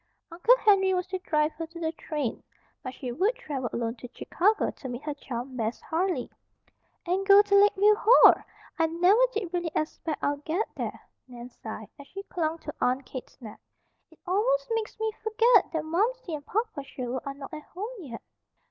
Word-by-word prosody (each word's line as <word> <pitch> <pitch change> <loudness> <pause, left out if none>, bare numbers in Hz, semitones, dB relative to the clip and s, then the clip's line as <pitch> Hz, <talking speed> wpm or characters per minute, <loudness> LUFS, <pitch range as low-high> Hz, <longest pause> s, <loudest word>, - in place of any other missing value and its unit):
Uncle 405 +9 +4
Henry 385 -4 +4
was 360 0 -1
to 375 0 -4
drive 305 -3 +1
her 330 0 -6
to 335 +1 -11
the 320 -1 -1
train; 300 -6 -4 0.4
but 255 - -5
she 255 -4 -5
would 390 - +1
travel 280 - -4
alone 230 -1 -2
to 245 +2 -10
Chicago 410 - +1
to 265 - -9
meet 245 +2 -6
her 300 - -3
chum, 260 -2 -6
Bess 225 -1 -2
Harley. 355 +3 -1 0.8
"And 365 +2 0
go 400 +1 +7
to 405 -1 -3
Lakeview 410 +1 +6
Hall! 485 +3 +8 0.5
I 325 - +4
never 355 +8 +4
did 405 -6 -4
really 350 -2 -1
expect 310 0 -3
I'd 285 0 -1
get 355 +9 -1
there," - - -4 0.3
Nan 245 0 -10
sighed, 220 -2 -8
as 280 - -11
she 390 +1 -8
clung 325 -4 -2
to 300 - -6
Aunt 255 +2 +1
Kate's 255 - -9
neck. 220 -5 -10 0.5
"It 320 - -21
almost - - +1
makes 450 -1 -2
me 440 0 0
forget 440 -1 +4
that 320 -2 -2
Momsey 405 +4 -1
and 290 -2 -6
Papa 440 -7 -2
Sherwood 255 -2 -5
are 275 0 -5
not 280 +3 -10
at 305 - -6
home 390 +8 -7
yet. 260 -10 -9
330 Hz, 190 wpm, -27 LUFS, 275-405 Hz, 0.8 s, Hall